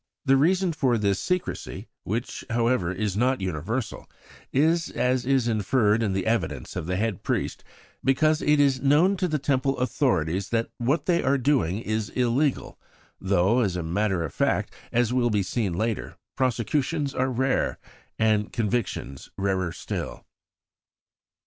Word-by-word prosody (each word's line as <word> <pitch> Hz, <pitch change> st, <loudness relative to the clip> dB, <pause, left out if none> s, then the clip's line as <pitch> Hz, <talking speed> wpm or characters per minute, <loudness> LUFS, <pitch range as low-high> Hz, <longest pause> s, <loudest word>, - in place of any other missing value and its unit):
The 135 Hz, -1 st, +5 dB
reason 180 Hz, +5 st, +2 dB
for 130 Hz, -6 st, +1 dB
this 100 Hz, -2 st, +1 dB
secrecy, 180 Hz, -1 st, -3 dB, 0.2 s
which, 115 Hz, +5 st, -3 dB
however, 115 Hz, -6 st, +1 dB
is 100 Hz, +1 st, -2 dB
not 130 Hz, +4 st, +2 dB
universal, 95 Hz, -, -3 dB, 0.4 s
is, 160 Hz, +4 st, +2 dB
as 125 Hz, 0 st, 0 dB
is 135 Hz, -3 st, +2 dB
inferred 110 Hz, 0 st, +2 dB
in 105 Hz, -4 st, 0 dB
the 95 Hz, -1 st, -1 dB
evidence 75 Hz, -, -1 dB
of 80 Hz, -, -4 dB
the 90 Hz, -, -1 dB
head 105 Hz, -1 st, -1 dB
priest, -, -, -2 dB, 0.4 s
because 155 Hz, +4 st, +3 dB
it 150 Hz, 0 st, +3 dB
is 135 Hz, -3 st, +3 dB
known 150 Hz, +8 st, +4 dB
to 180 Hz, -, 0 dB
the 155 Hz, -3 st, 0 dB
Temple 135 Hz, -1 st, 0 dB
authorities 100 Hz, -, 0 dB
that 115 Hz, -1 st, -1 dB
what 135 Hz, +7 st, 0 dB
they 170 Hz, -2 st, +2 dB
are 140 Hz, +2 st, +2 dB
doing 125 Hz, -, +1 dB
is 110 Hz, -1 st, -2 dB
illegal; 125 Hz, +3 st, 0 dB, 0.4 s
though, 95 Hz, +4 st, +2 dB
as 100 Hz, -7 st, +1 dB
a 90 Hz, -, -2 dB
matter 95 Hz, +1 st, 0 dB
of 80 Hz, -, -5 dB
fact, -, -, 0 dB, 0.2 s
as 120 Hz, 0 st, +1 dB
will 125 Hz, -1 st, +2 dB
be 105 Hz, -3 st, +1 dB
seen 100 Hz, -1 st, -1 dB
later, 110 Hz, +4 st, -2 dB, 0.2 s
prosecutions 135 Hz, +4 st, 0 dB
are 130 Hz, +1 st, 0 dB
rare, 130 Hz, +2 st, 0 dB, 0.4 s
and 110 Hz, -2 st, +2 dB
convictions 105 Hz, -, -2 dB
rarer 95 Hz, -3 st, 0 dB
still. -, -, -6 dB
120 Hz, 150 wpm, -25 LUFS, 100-135 Hz, 0.4 s, The